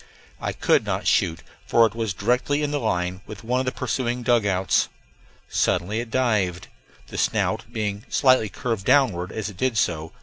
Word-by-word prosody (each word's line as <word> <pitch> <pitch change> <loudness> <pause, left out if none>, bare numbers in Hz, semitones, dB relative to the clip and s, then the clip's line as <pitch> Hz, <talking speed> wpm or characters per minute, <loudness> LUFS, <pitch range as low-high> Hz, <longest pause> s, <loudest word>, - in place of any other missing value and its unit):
I - - -2
could - - +2
not - - -2
shoot, 80 - +1 0.2
for 115 - +5
it 110 - -1
was 110 -4 -2
directly 125 +8 +1
in 145 - -1
line 90 -10 -1
with 105 0 -9
one 125 +3 0
of 130 - -2
the - - +1
pursuing 125 -1 -2
dugouts. 100 -6 +2 0.6
Suddenly 105 +6 0
it 120 -1 -5
dived, 105 -8 0 0.4
the - - -5
snout 115 - 0
being 105 -2 -3
slightly 130 -5 +3
curved 115 -4 -3
downward 125 -10 +3
as 110 - -4
it 100 - -12
did 125 +1 0
so. 80 -4 0
110 Hz, 170 wpm, -24 LUFS, 95-125 Hz, 0.6 s, for